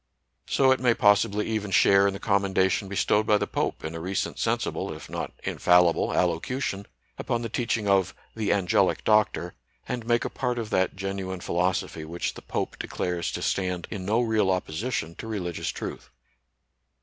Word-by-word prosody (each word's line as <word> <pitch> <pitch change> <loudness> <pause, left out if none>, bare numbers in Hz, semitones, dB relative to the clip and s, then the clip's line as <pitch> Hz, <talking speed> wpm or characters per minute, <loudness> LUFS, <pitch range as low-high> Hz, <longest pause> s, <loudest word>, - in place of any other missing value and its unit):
So 135 -1 +4
it 130 - +3
may 120 -2 +3
possibly 105 0 +3
even 110 -2 -2
share 100 +1 +5
in 100 - 0
the - - -6
commendation 95 -1 +1
bestowed 105 +2 +1
by 105 - +5
the - - -1
Pope, - - -2
in 80 - -4
a 80 - -5
recent 95 +3 -3
sensible - - -1
if - - -9
not - - -4
infallible 90 -1 +3
allocution, 100 +4 -1 0.3
upon 120 0 -1
the 115 - -3
teaching 115 -2 -1
of 95 -3 +2
" - - -35
the 110 -2 0
Angelic 95 -4 +2
Doctor," 105 -5 +2 0.3
and 125 -2 -3
make 120 0 +2
a - - -1
part 125 -2 -2
of 115 -2 -4
that 95 0 +1
genuine 95 -1 -4
philosophy 90 -2 -1
which 85 +2 -3
the - - -11
Pope - - -3
declares 90 -1 -2
to - - -3
stand 90 -2 -1
in 100 -4 -4
no 110 +5 +2
real 110 -4 +2
opposition 95 +1 -2
to 115 - -7
religious 90 -6 -3
truth. - - -6
100 Hz, 175 wpm, -26 LUFS, 90-110 Hz, 0.3 s, share